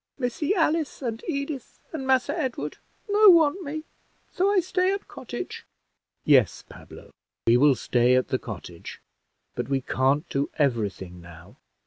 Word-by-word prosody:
Missy 280 - -1
Alice 320 -4 0
and 230 -2 -4
Edith 280 -4 -4
and 270 -4 -4
Massa 265 +2 +2
Edward 255 - -4 0.3
no 415 0 +6
want 335 0 +5
me, 310 -1 -5 0.5
so 390 +2 +1
I 405 - +4
stay 365 +1 +1
at 400 0 -4
cottage." - - -7 0.6
"Yes, 130 - +4
Pablo, - - -14 0.3
we 115 - +5
will 140 +2 +5
stay 125 +1 +2
at 130 - +1
the 130 - 0
cottage, 90 -6 -9 0.5
but - - -4
we 135 -1 +1
can't 135 +6 +1
do 140 +1 -1
every 120 -8 +1
thing 90 -2 -11
now. 85 0 -14
240 Hz, 150 wpm, -25 LUFS, -, 0.6 s, no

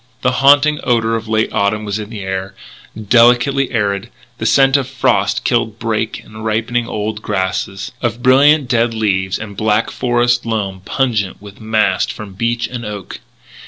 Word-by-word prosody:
The 125 0 +1
haunting 145 +2 +5
odour 115 -2 +1
of 115 0 -3
late 110 0 0
autumn 105 +1 0
was 100 +1 -3
in 105 -1 -7
the 110 -3 -7
air 95 0 -4 0.4
delicately 120 +5 +3
acrid 100 -4 -1 0.3
the - - -1
scent 135 0 +4
of 140 -3 +1
frost 100 -6 0
killed 115 -3 0
brake 115 -1 -2
and 110 0 -11
ripening 115 +2 -1
wild 105 0 -4
grasses, 95 +1 -3
of 120 0 -2
brilliant 140 +2 +5
dead 120 -1 +1
leaves 95 -3 0
and 105 -2 -8
black 110 +2 0
forest 120 -1 +1
loam 100 -5 -3
pungent 110 -8 -1
with 100 0 -13
mast 110 -4 +1
from 105 -3 -9
beech 115 +3 -1
and 120 -1 -6
oak. 105 -3 -7
110 Hz, 160 wpm, -16 LUFS, 105-120 Hz, 0.4 s, haunting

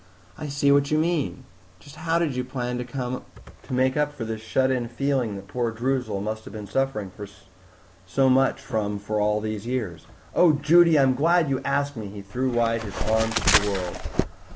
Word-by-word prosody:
"I 155 - -6
see 140 0 +2
what 140 0 +4
you 155 - +2
mean. 155 -5 -1 0.4
Just 145 - -14
how 165 0 0
did 165 -6 0
you 125 - -1
plan 125 -1 -3
to 125 0 -4 0.5
make 130 0 +1
up 150 0 +1
for 130 -6 -6
this 110 -1 -4
shut 130 +5 +1
in 125 -2 -1
feeling 125 -3 -1
that 100 0 -9
poor 120 +2 -1
Droozle 115 -4 -2
must 110 +1 -4
have - - -10
been 105 -2 -6
suffering 105 -3 -2 1.0
so 135 +8 +2
much 135 +1 +3
from 110 -6 -2
for 105 +1 -2
all 105 0 +2
these 110 0 -4
years?" 110 -10 -3 0.3
"Oh, 175 -3 +5
Judy, 165 +2 +5
I'm 135 -2 +4
so - - -7
glad 165 -1 +3
you 135 - +1
asked 140 +1 0
me!" 110 -2 -5
He 100 0 -9
threw 125 +7 -2
wide 115 -2 +1
his 105 -3 -7
arms 110 +1 +2
to - - +6
the 105 - -1
world. 90 -3 -3
125 Hz, 200 wpm, -25 LUFS, 110-140 Hz, 1.0 s, to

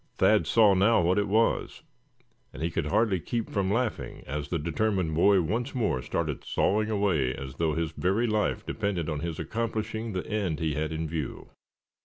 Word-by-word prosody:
Thad - - +4
saw 110 -3 +5
now 100 +5 +4
what 90 +4 +2
it 100 - 0
was, 110 +3 +1 0.7
and - - -7
he 85 - 0
could 80 -2 -1
hardly 105 +1 +2
keep 115 +7 -3
from 100 -2 0
laughing 115 +1 -2
as 75 +2 -4
the 85 - 0
determined 85 +2 0
boy 95 +4 +4
once 120 - -2
more 110 - 0
started 75 +1 -3
sawing 110 +2 +1
away 90 -12 +1
as 65 0 -8
though 80 -2 0
his 80 -1 -1
very 95 +8 0
life 110 -2 0
depended 95 -6 -2
on 75 -2 -2
his 85 -1 -4
accomplishing 110 -1 -3
the 90 - -3
end 100 -8 -2
he 80 -2 0
had 75 +2 -2
in 80 0 -3
view. 75 -3 -5
95 Hz, 185 wpm, -28 LUFS, 80-110 Hz, 0.7 s, saw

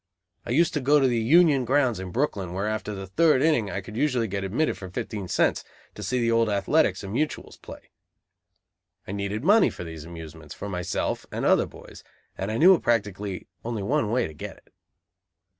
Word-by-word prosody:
I - - -8
used 160 +7 +3
to 150 - -1
go 145 +3 +4
to 135 - +3
the 120 -2 +1
Union 145 +3 +4
grounds 130 -4 +1
in 95 -1 -6
Brooklyn, 100 -9 -2
where 95 +2 -2
after 105 -1 -3
the 95 0 -6
third 150 - +3
inning, 150 -10 +2
I 95 - -3
could 105 +3 -10
usually 125 -3 +1
get 100 0 -3
admitted 115 +12 0
for 95 - -8
fifteen 95 +1 -5
cents, - - +1 0.3
to - - -10
see 125 - -1
the 115 -1 +1
old 115 -1 +3
Athletics 100 +1 +1
or 100 - -6
Mutuals 150 +9 -3
play. - - -12 1.2
I - - -5
needed 100 +3 -3
money 205 +5 +5
for - - -8
these 80 -2 -8
amusements, 80 -2 -10
for - - -6
myself 90 -3 -3
and - - -3
other - - +4
boys, - - -13 0.3
and 95 - -4
I 110 - -1
knew 180 +5 +7
of 180 - +1
practically 105 -4 -1 0.2
only 115 -3 -3
one 130 0 0
way 125 +3 +1
to 80 - -7
get 75 - -8
it. - - -25
110 Hz, 205 wpm, -25 LUFS, 95-135 Hz, 1.2 s, knew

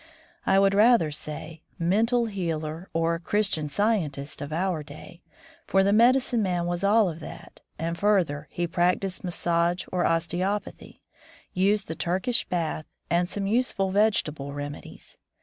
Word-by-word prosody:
I 195 - +4
would 195 0 +4
rather 210 -6 +5
say, 155 +2 -6 0.2
mental 225 +8 +2
healer 165 -4 -4
or 165 0 0
Christian 190 -4 0
scien 200 0 +1
tist 140 +2 -7
of 145 +1 -5
our 175 0 -1
day, 155 +3 -12 0.5
for 195 0 +3
the 200 +1 +3
medicine 245 +1 +4
man 180 -3 0
was 175 +1 -2
all 210 +1 +4
of 165 -2 -5
that, - - -11 0.2
and 165 +1 -2
further 170 -8 +1
he 175 - -2
practised 180 +2 0
massage 175 0 0
or 180 -1 0
osteopathy, 175 +5 -2 0.5
used 200 +2 +1
the - - -3
Turkish 185 +9 0
bath, 160 -3 -2 0.2
and 175 +1 +2
some 200 -1 -3
useful 200 -3 +1
vegetable 155 -9 +1
remedies. 145 0 -7
175 Hz, 145 wpm, -26 LUFS, 160-200 Hz, 0.5 s, rather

